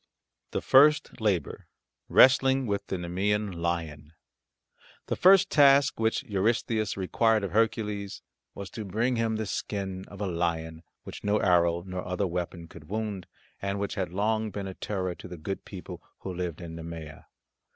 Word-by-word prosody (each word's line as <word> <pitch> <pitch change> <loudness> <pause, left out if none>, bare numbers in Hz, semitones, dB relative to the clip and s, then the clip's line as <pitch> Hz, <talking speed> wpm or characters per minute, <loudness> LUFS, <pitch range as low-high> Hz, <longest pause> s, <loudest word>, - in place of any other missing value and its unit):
THE - - -3
FIRST 145 -1 +4
LABOUR 95 -8 -1 0.4
WRESTLING 135 0 +5
WITH 100 -2 -2
THE 95 - -2
NEMEAN 100 +4 -1
LION 85 -3 -4 0.9
The - - -2
first 195 +1 +6
task 140 -3 +5
which 110 +4 +1
Eurystheus 110 -1 0
required 110 +3 +2
of 100 - -3
Hercules 105 -2 -1 0.3
was 100 -1 -7
to 110 - -6
bring 115 +6 0
him 115 -1 0
the 110 0 -2
skin 95 -2 -4
of 100 - -12
a 105 - -1
lion 85 -2 -2 0.2
which - - -9
no 105 +1 +2
arrow 85 -3 +3
nor 90 -1 -5
other 90 +2 -1
weapon 85 -1 -4
could 75 0 -14
wound, 105 -4 -3 0.3
and 100 0 -2
which 100 - -2
had 95 -3 -2
long 110 +3 0
been 100 -1 -5
a 95 - -5
terror 95 -2 -3
to 85 - -11
the 90 -1 -8
good 95 +5 -5
people 95 -3 -9 0.2
who 95 - -5
lived 90 -2 -4
in 85 -1 -7
Nemea. 80 -2 -8
100 Hz, 160 wpm, -28 LUFS, 90-110 Hz, 0.9 s, first